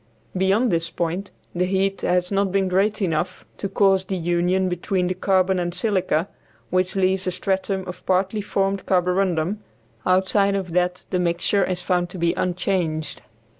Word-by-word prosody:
Beyond 195 +6 +2
this 165 -1 0
point 175 +4 -3 0.2
the 180 +1 +1
heat 195 +1 0
has 180 +1 +1
not 195 -1 +1
been 195 0 +1
great 200 +3 +1
enough 165 -1 -2
to 195 - -3
cause 195 -1 +3
the 190 0 -2
union 175 +2 +1
between 180 +1 -1
the 180 - 0
carbon 185 0 +2
and 175 0 -2
silica, 185 -4 0 0.4
which 185 +1 +1
leaves 190 -1 +1
a - - +1
stratum 190 +1 -1
of 180 - -8
partly 190 +3 +1
formed 195 -1 -1
carborundum; 180 0 +1 0.4
outside 190 +2 +2
of 190 -3 -3
that 180 +1 0
the 180 - +1
mixture 175 +3 +1
is 180 -1 -1
found 180 -1 0
to 185 - -8
be 170 -1 +1
unchanged. 175 -5 -1
185 Hz, 165 wpm, -23 LUFS, 180-195 Hz, 0.4 s, cause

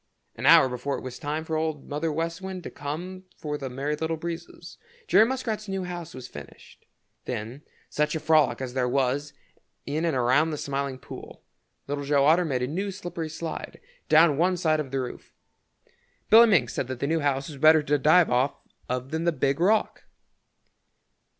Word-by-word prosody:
An - - -2
hour - - +8
before 125 +2 -3
it - - -9
was 130 -1 -7
time 155 +1 -3
for 160 - -3
Old 155 -2 -2
Mother 150 +3 -2
West 165 +3 -3
Wind 190 -1 -6
to - - -7
come 175 +6 -6
for 150 -1 -4
the 135 -2 -5
Merry 140 +4 -2
Little 160 +1 -2
Breezes, 170 +1 -8 0.3
Jerry 220 - +6
Muskrat's 225 -5 -3
new 195 -1 -3
house 175 -2 -7
was 125 - -8
finished. 75 - -13 0.4
Then 120 +3 -5 0.3
such 150 +1 -1
a - - -1
frolic 150 -7 +3
as 130 -2 -5
there 125 -1 0
was 135 +2 0 0.5
in 150 +3 -2
and 165 -4 +1
around 130 +6 +3
the 155 - -3
Smiling 140 -2 -3
Pool! - - -11 0.4
Little 145 0 -3
Joe 140 -1 +2
Otter 165 +4 +4
made 130 -5 -1
a - - 0
new 190 +8 -3
slippery 175 -4 -5
slide 160 +1 -6 0.3
down 155 -2 +5
one 180 +1 +2
side 155 -3 +1
of 145 -3 -3
the 135 +1 -2
roof. 125 -1 -7 1.0
Billy 230 +2 +9
Mink 150 - +3
said 130 - -3
that 130 -1 -5
the - - -1
new 160 +3 +1
house 140 -2 0
was 145 -3 -9
better 155 +1 +6
to 145 0 +1
dive 155 +4 +5
off 130 +3 +2 0.3
of 125 +1 -3
than 160 +1 -2
the 170 - +3
Big 140 -2 0
Rock. 210 +5 +1
150 Hz, 190 wpm, -26 LUFS, 135-170 Hz, 1.0 s, Billy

